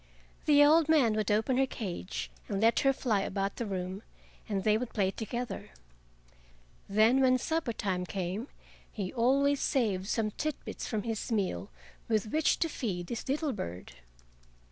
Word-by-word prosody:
The 290 -1 +7
old 315 +1 +5
man 275 -9 +5
would 215 -2 -1
open 220 +5 +2
her 270 0 +3
cage 190 -5 -5 0.2
and 200 -2 -1
let 225 +2 +4
her 270 -2 +4
fly 230 -6 0
about 195 0 -2
the 235 - -3
room, 185 0 -4 0.5
and 195 -2 -1
they 215 -1 +4
would 235 +2 -2
play 195 -3 +2
together. 230 0 -5 1.2
Then 220 +6 +4
when 255 -1 +5
supper 320 0 -1
time 185 -4 -2
came, 190 +6 -3 0.4
he 195 -5 -4
always 275 +4 +3
saved 200 -8 0
some 215 -1 0
tit 305 +6 -2
bits - - -5
from 215 -3 -2
his 225 +1 -3
meal 190 - -1 0.4
with 215 -1 0
which 315 0 +2
to 330 - +3
feed 190 - -4
his 235 - -4
little 295 0 0
bird. 90 - -6
220 Hz, 165 wpm, -30 LUFS, 195-265 Hz, 1.2 s, The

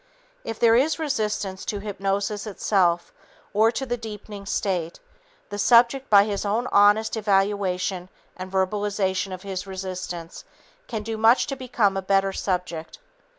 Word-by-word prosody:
If 225 - -5
there 230 -1 +5
is 285 +6 +2
resistance 215 - -2
to 205 - -3
hypnosis 200 +1 -2
itself 180 -4 +1 0.4
or 220 +2 +4
to 270 - -3
deepening 215 -4 -6
the - - -7
state, 175 -4 -2 0.5
the 205 0 -5
subject 245 +5 +4
by 200 -1 +7
his 205 -2 -2
own 215 +4 0
honest 205 +3 +4
evaluation 195 -3 0 0.3
and 185 0 -8
verbalization 190 0 0
of 185 0 -7
his 190 -1 -5
resistance 185 -3 -6 0.4
can 220 -2 -4
do 220 0 -4
much 225 +3 +4
to 275 - -4
become 240 -6 0
a 195 - -1
better 195 0 +1
subject. 180 -5 -3
200 Hz, 145 wpm, -24 LUFS, 190-220 Hz, 0.5 s, by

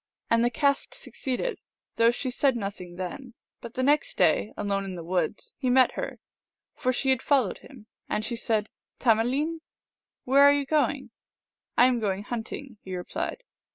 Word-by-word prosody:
And 230 0 +4
the 240 - +3
cast 280 +3 0
succeeded, 485 - -3 0.4
though 230 0 +6
she 250 +2 -2
said 265 0 +2
nothing 195 -5 -5
then. 240 +7 -6 0.2
But 235 0 -10
the 255 - 0
next 290 +2 +2
day, 180 +4 +3
alone 200 -1 -1
in 190 -1 -5
the 170 - -7
woods, 175 +3 -2
he 255 - 0
met 255 0 +5
her, - - -5 0.6
for 255 - 0
she 265 +1 +1
had 260 - +2
followed 265 -9 +2
him. 250 -6 -14 0.2
And 215 - -1
she 235 - -2
said, 220 -2 -1
" - - -54
Tamealeen? 260 +8 +2 0.2
" - - -65
" - - -65
Where 270 +2 +5
are 285 0 +8
you 285 -1 0
going? 300 +1 0 0.3
" - - -56
"I 245 - +7
am 250 -1 +3
going 200 -2 -1
hunting," 235 +1 -6
he 185 -1 -6
replied. 180 - -4
240 Hz, 190 wpm, -27 LUFS, 205-275 Hz, 0.6 s, are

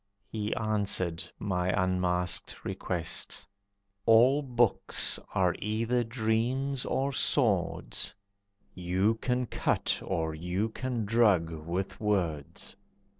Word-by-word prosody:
He 105 -1 -2
answered 100 -6 -1
my 90 -2 -1
unasked 90 -2 0
request: 85 0 -3 0.6
"All 125 +6 +6
books 120 -5 +1 0.2
are 90 -2 +3
either 115 +4 0
dreams 120 +4 0
or 135 +1 0
swords, 90 - 0 0.6
You 95 +4 +1
can 125 +2 -1
cut, - - 0
or 80 -1 -1
you 90 +7 -1
can 120 -1 -3
drug, 100 -7 +3
with 85 +4 -4
words. 85 -9 -1
105 Hz, 95 wpm, -30 LUFS, 90-115 Hz, 0.6 s, All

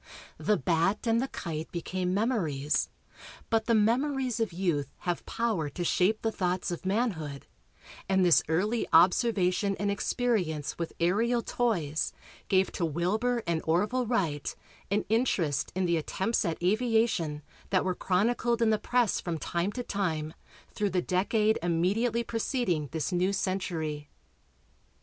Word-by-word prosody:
"The 210 - +2
bat" 170 - +1
and 230 0 +2
the 265 - -1
kite 160 -10 -5
became 180 +1 -2
memories, 175 - 0 0.6
but 225 -1 +2
the 230 - +4
memories 250 +3 +1
of 225 -3 0
youth 170 -6 -1
have 175 -1 -2
power 215 -10 -1
to 175 +5 -4
shape 190 +5 +2
the 225 - +1
thoughts 180 -2 -1
of 175 +2 -5
manhood, 185 - -1 0.6
and 190 -1 +3
this 175 - +6
early 205 +9 0
observation 190 +2 +3
and 205 0 0
experience 190 - -1
with 170 - -3
aerial 225 +8 +2
toys 170 -11 -1 0.3
gave 190 0 +2
to - - -3
Wilbur 210 +10 0
and 170 -2 0
Orville 210 +10 +1
Wright 165 - -1 0.3
an 205 +1 0
interest 175 - +1
in 185 0 +1
the 170 -1 +2
attempts 190 +8 -1
at 165 -2 -1
aviation 215 -7 +1 0.3
that 185 -1 +2
were 185 - +1
chronicled 225 +6 +1
in 220 - +4
the 215 - +2
press 245 -3 +1
from 170 -2 -3
time 170 +5 -1
to 250 - -4
time 160 -8 -2 0.4
through 205 -1 0
the 180 -1 0
decade 210 +4 +1
immediately 200 +8 +1
preceding 225 - -1
this 160 +2 -2
new 180 +2 +1
century. 165 -7 -2
190 Hz, 145 wpm, -29 LUFS, 170-225 Hz, 0.6 s, this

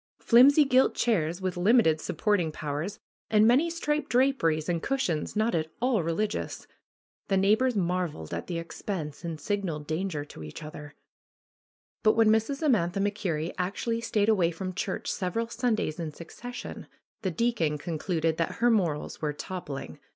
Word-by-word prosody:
flimsy 280 +5 +6
gilt 260 -1 +4
chairs 175 -5 0
with 185 -1 -1
limited 180 -4 +4
supporting 200 -7 0
powers 155 +6 -4 0.3
and 215 0 +5
many 265 +9 +4
striped 300 -2 -1
draperies 240 - +2
and 170 -2 0
cushions 220 - -1
not 220 +2 +1
at 160 -2 0
all 245 -4 +2
religious. 185 +6 -2 0.6
The 195 - +2
neighbors 220 +6 +3
marveled 175 - -2
at 85 - -4
the 170 - -3
expense 165 -2 -5
and 165 -2 -4
signaled 175 -4 -2
danger 155 -1 -2
to 145 - -12
each 75 - -8
other. 150 -1 -9 1.1
But 215 - +5
when 225 -1 +4
Mrs. 225 +7 +1
Amantha 200 - +2
MacKerrie 185 -6 -1
actually 230 +5 -1
stayed 215 -2 +1
away 190 -6 +3
from 185 +2 -5
church 185 - -3
several 225 +5 -2
Sundays 230 -9 -1
in 160 -2 -3
succession 245 +11 -8 0.3
the 195 - 0
deacon 175 -6 0
concluded 160 +1 -1
that 165 - -1
her 240 +1 +3
morals 170 -9 0
were 150 -1 -1
toppling. 150 -3 -6
185 Hz, 150 wpm, -28 LUFS, 160-230 Hz, 1.1 s, flimsy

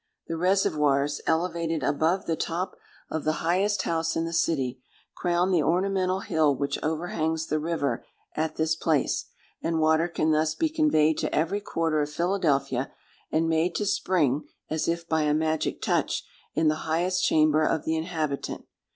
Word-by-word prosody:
The 165 - -4
reservoirs, 150 -6 +2
elevated 165 -2 0
above 160 +8 +1
the 165 - 0
top 180 +4 -3 0.4
of 160 - -2
the 155 - +1
highest 190 +3 +2
house 165 0 -1
in 165 - 0
the 165 - -4
city, 135 -6 0 0.3
crown 175 +1 +1
the 175 -4 +3
ornamental 185 +3 +1
hill 155 -6 +2
which 140 +1 -2
overhangs 160 0 -1
the 155 -1 -1
river 150 -6 -1 0.3
at 155 0 -2
this 160 0 +1
place; 160 -2 0 0.4
and 165 -1 0
water 160 +1 +3
can 160 -2 0
thus 155 0 +2
be 320 - +1
conveyed 295 - +3
to - - -1
every 175 +7 0
quarter 160 -5 0
of 145 - -1
Philadelphia, 150 -7 0 0.4
and 160 +1 +2
made 165 +2 +1
to 210 - 0
spring, 155 -8 +1 0.2
as 155 0 -1
if 170 0 -1
by 160 -1 +1
a 150 0 +2
magic 160 0 -1
touch, - - 0 0.3
in 160 - +2
the 155 +1 -1
highest 180 +3 +1
chamber 155 0 +4
of 155 0 +1
the 160 - +1
inhabitant. 160 -3 -3
160 Hz, 165 wpm, -26 LUFS, 155-175 Hz, 0.4 s, chamber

